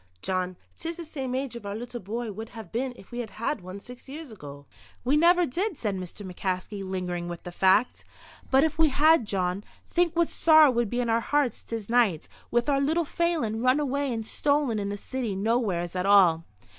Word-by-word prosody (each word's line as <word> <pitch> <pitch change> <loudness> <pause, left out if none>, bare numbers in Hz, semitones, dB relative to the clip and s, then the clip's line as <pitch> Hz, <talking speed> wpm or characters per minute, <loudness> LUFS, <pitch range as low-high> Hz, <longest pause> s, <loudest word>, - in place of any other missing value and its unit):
Jawn, 185 -1 -2 0.2
'tis 330 +1 -5
the 340 - -7
same 265 -5 -4
age 265 -2 -3
our 200 0 -4
little 240 +2 -6
bye 225 +3 -4
would 220 +3 -7
have 220 -6 -10
been 255 +3 -1
if 195 - -16
we 240 - -5
had 235 -3 -4
had 225 +3 -3
one 185 +2 -8
six 250 +5 -12
years 295 -1 -8
ago." 145 -8 -10 0.4
"We 270 +4 +3
never 345 +3 +5
did," 355 - -2
said 210 -4 -2
Mr. 185 +2 -7
McCaskey, 185 +2 -3
lingering 180 -2 -3
with 175 -1 -7
the 175 - -7
fact. 190 +6 +2 0.5
"But 265 +1 +5
if 315 0 -1
we 320 -1 +5
had, 305 -1 +4
Jawn, 190 -1 -1 0.2
think 345 -1 +1
what 340 -1 +2
sorrow 310 -3 +6
would 235 -3 0
be 245 +3 -1
in 240 - -2
our 225 - +3
hearts 285 +1 0
this 225 -3 -6
night, 230 -9 +2 0.2
with 240 0 +1
our 275 -1 +2
little 320 +4 +1
Phelan 300 -10 -1
run 255 +3 +3
away 280 -1 -1
and 225 -2 -3
stolen 285 -3 +1
in 200 0 -2
the 205 - -3
city 235 -2 -3
nowheres 195 -5 0
at 180 +1 -1
all." 175 -5 +5
235 Hz, 205 wpm, -27 LUFS, 195-280 Hz, 0.5 s, sorrow